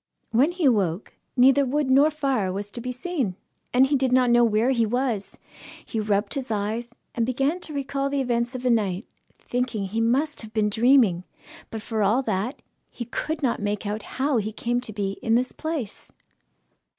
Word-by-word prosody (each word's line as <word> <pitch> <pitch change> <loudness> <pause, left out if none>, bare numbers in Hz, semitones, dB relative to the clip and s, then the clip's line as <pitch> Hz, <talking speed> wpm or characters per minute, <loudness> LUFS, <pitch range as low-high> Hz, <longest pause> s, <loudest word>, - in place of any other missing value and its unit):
When 265 +9 +4
he 355 -3 -1
awoke, 200 -7 +1 0.2
neither 270 +3 +6
wood 275 +1 0
nor 280 +3 +6
fire 275 -10 -1
was 200 +2 -5
to 235 - -5
be 250 +1 -3
seen, 255 - -2 0.4
and 255 +2 +5
he 285 +2 +1
did 260 -2 +1
not 250 -1 +4
know 240 0 +6
where 230 +2 +3
he 235 -3 +2
was. 235 -2 -1 0.5
He 225 - -3
rubbed 205 -1 0
his 270 -3 -4
eyes, 225 +3 -3 0.2
and 235 - 0
began 270 +8 0
to 315 - -5
recall 275 0 -2
the 280 0 -1
events 240 -1 -1
of 255 - -5
the 250 - +3
night, 205 -3 0 0.3
thinking 245 -5 -2
he 225 +3 -1
must 275 +7 +1
have 220 -1 -10
been 210 -1 +2
dreaming; 225 -6 +4 0.5
but 220 -1 -6
for 220 -2 -2
all 215 +7 +3
that, 215 +5 -2 0.3
he 240 - -7
could 310 +6 -4
not 240 -5 0
make 205 0 -2
out 210 +2 -2 0.2
how 270 0 +2
he 215 0 -1
came 240 +3 -1
to 235 - -5
be 200 -2 -3
in 225 - +2
this 250 +1 +1
place. 315 -10 -5
240 Hz, 195 wpm, -25 LUFS, 215-270 Hz, 0.5 s, neither